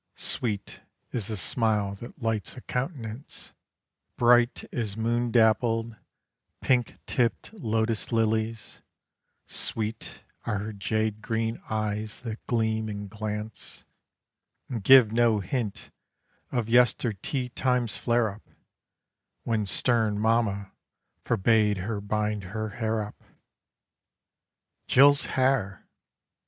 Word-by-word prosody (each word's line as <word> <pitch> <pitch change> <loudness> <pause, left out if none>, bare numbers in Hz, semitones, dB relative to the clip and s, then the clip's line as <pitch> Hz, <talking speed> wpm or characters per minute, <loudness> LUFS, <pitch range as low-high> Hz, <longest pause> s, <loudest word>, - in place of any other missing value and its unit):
Sweet, 105 -5 -2 0.3
is 110 -5 -2
the 110 -2 -3
smile 105 0 +1
that 120 +4 -10
lights 115 +1 -2
a - - -7
countenance 125 -2 -5 0.6
Bright 120 0 +4
as 110 -4 -2
moon 120 +2 0
dappled, 115 0 +3 0.6
pink 125 -3 +1
tipped 120 - -1
lotus 115 - -1
lilies; 110 0 -1 0.6
Sweet, 110 0 -3 0.2
are 105 -3 -1
her 105 +2 -4
jade 110 +1 -1
green 115 0 -2
eyes 110 0 -2
that 115 -2 -6
gleam 110 -2 0
and 100 -1 -6
glance 105 0 -6 0.8
And 115 -5 -4
give 125 -1 +8
no 115 -2 +3
hint 105 +2 -3 0.6
of 120 -3 -1
yester 120 -1 +3
tea 125 +6 -3
time's 125 -2 0
flare 115 -3 +1
up 105 +2 -15 0.9
When 110 -3 0
stern 110 -1 +2
mamma 105 -3 +1 0.5
forbade 105 0 +3
her 100 +3 -3
bind 105 -1 -1
her 110 +3 -4
hair 110 +1 -1
up. 105 - -11 1.6
Jill's 145 +2 +6
hair! 130 - 0
110 Hz, 105 wpm, -27 LUFS, 105-120 Hz, 1.6 s, give